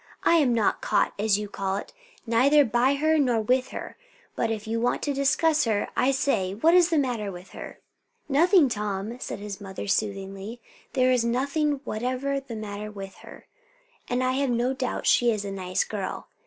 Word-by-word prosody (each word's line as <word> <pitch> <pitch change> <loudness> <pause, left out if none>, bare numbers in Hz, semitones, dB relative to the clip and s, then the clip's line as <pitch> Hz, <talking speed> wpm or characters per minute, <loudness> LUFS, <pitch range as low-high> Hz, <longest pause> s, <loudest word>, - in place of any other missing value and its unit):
"I 335 - +5
am 285 -6 +3
not 220 -3 +1
caught, - - +1
as 210 -1 +3
you 210 0 -4
call 195 -1 -3
it, - - -8 0.3
neither 270 +6 +4
by 245 +4 +2
her 310 +2 +2
nor 245 -5 +2
with 255 +4 +1
her; - - -8 0.4
but 230 - 0
if 220 -1 -3
you 225 +1 -2
want 245 - 0
to 290 - 0
discuss 300 +2 +2
her, 215 -3 0
I 255 - +2
say, 225 -8 0
what's 335 - +5
the 330 - +1
matter 240 -8 -1
with 180 +1 -11
her?" - - -9 0.5
"Nothing, 325 +3 +5
Tom!" 210 0 -3
said - - -5
his 205 0 -7
mother 195 0 -7
soothingly; 195 +2 -3 0.3
"there 255 -1 +3
is 250 -2 +2
nothing 280 +4 0
whatever 255 +5 -2
the 265 -4 -9
matter 210 -1 -6
with 195 -2 -9
her; - - -13 0.6
and 245 +1 0
I 255 - +2
have 270 +1 0
no 245 +2 +1
doubt 260 -1 -3
she 240 - +4
is 210 -3 -1
a 200 - -4
nice 185 -2 -1
girl. 200 -3 -5
240 Hz, 190 wpm, -26 LUFS, 210-275 Hz, 0.6 s, I